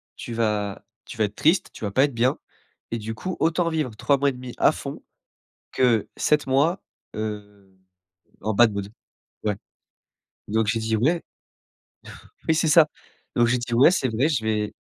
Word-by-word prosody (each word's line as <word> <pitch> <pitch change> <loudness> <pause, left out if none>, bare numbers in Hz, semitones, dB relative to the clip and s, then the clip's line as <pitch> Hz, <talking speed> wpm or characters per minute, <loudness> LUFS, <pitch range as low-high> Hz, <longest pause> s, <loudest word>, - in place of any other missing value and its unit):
tu 120 - -7
vas 105 -3 -1 0.2
tu 125 - -10
vas 110 - +2
être 105 0 -7
triste, 165 +5 +2
tu - - -11
vas 100 - -2
pas 130 +6 +4
être 140 -2 +1
bien 120 +3 +1 0.5
et 115 - -1
du 110 +1 -5
coup 185 +8 -5
autant 165 +1 +2
vivre 150 -9 -2
3 140 +5 +2
mois 140 +1 +1
et - - -1
1/2 125 -1 -8
à - - +5
fond - - -7 0.7
que 120 -4 +2
7 150 -1 +2
mois, 145 +8 +2 0.3
heu, 105 -2 -6 0.7
en 110 +2 -1
bad 115 +2 +5
mood.» 100 0 -4 0.5
Ouais, 105 -2 -1 0.9
donc 110 +1 +1
j'ai 115 +1 +1
dit: 110 0 0
«Ouais.» 160 +10 +1 1.3
Oui 160 - +3
c'est 160 - +2
ça, 155 0 +6 0.5
donc 120 -1 +4
j'ai 125 +1 +2
dit: 120 0 -4
«Ouais 125 +8 +6
c'est 135 -8 0
vrai, 115 +6 +1
je 130 -8 0
vais» 105 -1 -1
120 Hz, 180 wpm, -24 LUFS, 110-145 Hz, 1.3 s, ça